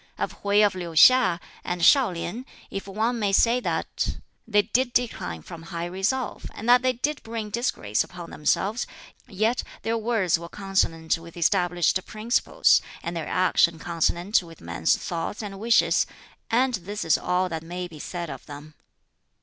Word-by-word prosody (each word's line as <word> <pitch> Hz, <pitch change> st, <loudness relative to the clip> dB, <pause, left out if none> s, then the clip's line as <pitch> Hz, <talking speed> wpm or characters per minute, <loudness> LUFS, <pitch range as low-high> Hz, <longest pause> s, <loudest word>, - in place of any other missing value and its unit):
"Of -, -, -4 dB
Hwķi 205 Hz, +1 st, +4 dB
of 205 Hz, -, +1 dB
Liu 180 Hz, -2 st, -5 dB
hiŠ 185 Hz, -1 st, +6 dB, 0.2 s
and 175 Hz, 0 st, -3 dB
ShŠu 255 Hz, -, +5 dB
lien, 215 Hz, +9 st, -5 dB, 0.3 s
if 195 Hz, 0 st, -5 dB
one 220 Hz, +5 st, -1 dB
may 205 Hz, -2 st, +1 dB
say 230 Hz, +5 st, +4 dB
that -, -, -2 dB, 0.3 s
they 205 Hz, -2 st, +3 dB
did 245 Hz, +4 st, 0 dB
decline 90 Hz, -, -1 dB
from 165 Hz, -, -10 dB
high 170 Hz, +1 st, -5 dB
resolve, 195 Hz, +9 st, -2 dB
and 225 Hz, -, -7 dB
that 245 Hz, 0 st, +7 dB
they 255 Hz, 0 st, +2 dB
did 290 Hz, +5 st, -2 dB
bring 225 Hz, -2 st, -5 dB
disgrace 155 Hz, -, 0 dB
upon 175 Hz, -2 st, -10 dB
themselves, 200 Hz, +9 st, 0 dB, 0.4 s
yet 215 Hz, +5 st, 0 dB, 0.2 s
their 225 Hz, 0 st, 0 dB
words 215 Hz, -7 st, +1 dB
were 170 Hz, 0 st, -8 dB
consonant 170 Hz, -5 st, 0 dB
with 165 Hz, +1 st, -13 dB
established 175 Hz, 0 st, +2 dB
principles, 220 Hz, +3 st, +2 dB, 0.2 s
and 170 Hz, -, -4 dB
their 165 Hz, -, -4 dB
action 175 Hz, -2 st, +3 dB
consonant 175 Hz, +5 st, +1 dB
with 165 Hz, -2 st, -13 dB
men's 85 Hz, 0 st, 0 dB
thoughts 175 Hz, +5 st, -4 dB
and 195 Hz, -2 st, -7 dB
wishes; 230 Hz, +2 st, +3 dB, 0.4 s
and 255 Hz, +3 st, +2 dB
this 205 Hz, 0 st, -4 dB
is 160 Hz, -, +4 dB
all 180 Hz, +1 st, 0 dB
that 160 Hz, -2 st, -4 dB
may 175 Hz, +2 st, -5 dB
be 160 Hz, -3 st, -12 dB
said 170 Hz, +1 st, -5 dB
of -, -, -8 dB
them. 150 Hz, +1 st, -10 dB
190 Hz, 165 wpm, -25 LUFS, 170-225 Hz, 0.4 s, that